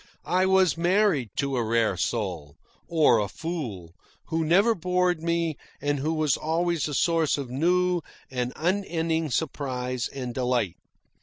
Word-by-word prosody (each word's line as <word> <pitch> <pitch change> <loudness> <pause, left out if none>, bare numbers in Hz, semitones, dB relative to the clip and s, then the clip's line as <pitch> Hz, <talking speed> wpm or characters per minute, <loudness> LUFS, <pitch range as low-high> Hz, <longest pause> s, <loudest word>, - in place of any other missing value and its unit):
I 185 +1 +2
was 190 -4 +4
married 175 - +2
to 140 -2 -1
a 120 - +1
rare 115 -2 +1
soul, 90 -8 -3 0.3
or 155 -8 +4
a 105 - 0
fool, 110 - -5 0.4
who 165 -1 0
never 195 +9 +4
bored 180 -2 0
me 170 -2 0 0.2
and 145 -1 -1
who 155 +4 -1
was 155 -3 +2
always 165 0 0
a 150 - -3
source 165 -2 +2
of 135 -4 -5
new 180 +5 +2 0.3
and 125 -1 -2
unending 165 -3 0
surprise 130 -4 -2
and 125 -3 -6
delight. 125 -8 0
155 Hz, 145 wpm, -26 LUFS, 125-175 Hz, 0.4 s, was